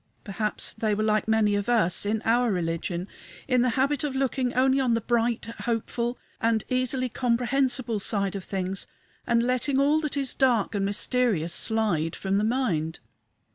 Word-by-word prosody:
Perhaps 210 +1 -2
they 215 -2 0
were 215 - -1
like 215 0 +1
many 220 -2 +3
of 205 +2 -1
us, 205 -5 +3
in 215 +1 -1
our 235 +1 +3
religion, 170 0 -2 0.4
in 255 -2 +3
the 250 - +3
habit 280 +3 +1
of 285 -3 -2
looking 265 -1 0
only 265 +1 +3
on 250 -3 +2
the - - +1
bright, 235 0 0 0.2
hopeful, 235 +1 -2 0.2
and 225 -1 +2
easily 255 0 0
comprehensible 245 -1 0
side 200 -1 0
of 195 - -5
things, 190 0 -3 0.4
and 235 0 +3
letting 255 +2 +1
all 290 +3 +3
that 300 -2 -3
is 275 -2 -1
dark 245 -7 +2
and 200 -1 0
mysterious 205 -4 0
slide 205 -9 0
from 195 +1 0
the - - 0
mind. 205 -10 -1
230 Hz, 170 wpm, -26 LUFS, 205-255 Hz, 0.4 s, many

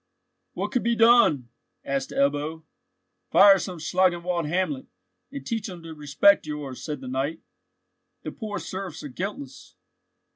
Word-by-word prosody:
"What - - -3
could 250 -3 +1
be 235 +1 +1
done?" 225 - +5 0.4
asked 135 -1 -2
Ebbo. 145 +3 -1 0.7
"Fire 195 -1 +7
some 180 -2 -5
Schlangenwald 175 0 0
hamlet, 160 -5 -1 0.4
and 135 -1 -7
teach 220 +4 -3
him 175 -3 -9
to 165 -1 -8
respect 150 +5 +3
yours," 145 -4 -6
said 150 -4 -5
the 130 - -8
knight. 135 +5 -2 0.8
"The - - -5
poor 215 -3 -5
serfs 190 -3 -6
are 145 - -6
guiltless." 140 -3 -7
165 Hz, 140 wpm, -25 LUFS, 140-195 Hz, 0.8 s, Fire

